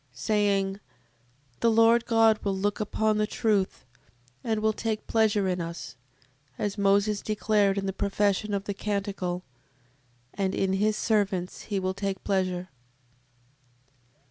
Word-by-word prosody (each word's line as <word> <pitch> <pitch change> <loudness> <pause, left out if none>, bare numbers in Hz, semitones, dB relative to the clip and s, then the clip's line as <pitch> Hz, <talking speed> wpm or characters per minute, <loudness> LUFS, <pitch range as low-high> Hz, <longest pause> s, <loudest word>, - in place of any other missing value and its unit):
Saying: 200 -2 0 0.8
The 230 - +3
Lord 230 +1 +4
God 225 -1 +4
will 195 -1 -1
look 205 +1 -1
upon 215 0 0
the 210 - +1
truth, 210 -4 0 0.6
and 220 -2 0
will 220 0 +1
take 220 0 -3
pleasure 215 -3 +2
in 180 -1 -1
us, 170 0 -6 0.6
as 205 -1 -2
Moses 200 0 +2
declared 210 -2 +1
in 195 - -1
the 195 - -2
profession 200 +1 0
of 195 - -2
the 205 - -3
canticle; 195 -3 -3 0.9
And 195 -1 -1
in 190 -1 0
his 210 +2 +1
servants 195 -5 -1
he 200 -2 0
will 185 0 -1
take 195 -1 -4
pleasure. 185 -2 -1
200 Hz, 135 wpm, -27 LUFS, 195-215 Hz, 0.9 s, Lord